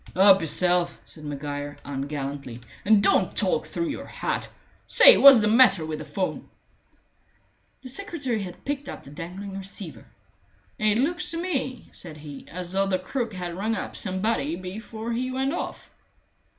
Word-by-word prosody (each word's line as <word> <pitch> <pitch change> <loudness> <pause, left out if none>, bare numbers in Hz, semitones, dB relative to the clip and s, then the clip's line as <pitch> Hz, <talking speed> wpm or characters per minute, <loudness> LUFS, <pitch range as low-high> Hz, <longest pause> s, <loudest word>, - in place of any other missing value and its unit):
"Help 195 0 +7
yourself," 175 +2 +1
said 155 - -15
Maguire, 145 0 -5
ungallantly, 140 -3 -5 0.2
"and 205 -1 +5
don't - - +3
talk 485 - +1
through 335 -1 -2
your 290 - -5
hat. - - -3 0.4
Say, - - +8
what's 275 -4 +9
the 210 - +3
matter 215 -7 +5
with 155 -1 -4
the - - -7
'phone?" 190 -2 -3 1.3
The 255 - -6
secretary 275 - -2
had 180 -2 -8
picked 285 0 -3
up - - -8
the 140 - -12
dangling 185 +5 -7
receiver. 195 -2 -6 0.7
"It 215 -1 +3
looks 335 +8 0
to 330 - -3
me," 265 -8 -3
said 160 -4 -6
he, 145 -2 -10
"as 180 0 -5
though 195 +1 +1
the 190 -1 +1
crook 220 +3 -4
had 175 -2 -5
rung 215 +4 -1
up - - -5
somebody 185 -5 -1
before 220 +5 -6
he 255 +2 -1
went 265 +2 -1
off." - - -5
195 Hz, 160 wpm, -25 LUFS, 165-250 Hz, 1.3 s, what's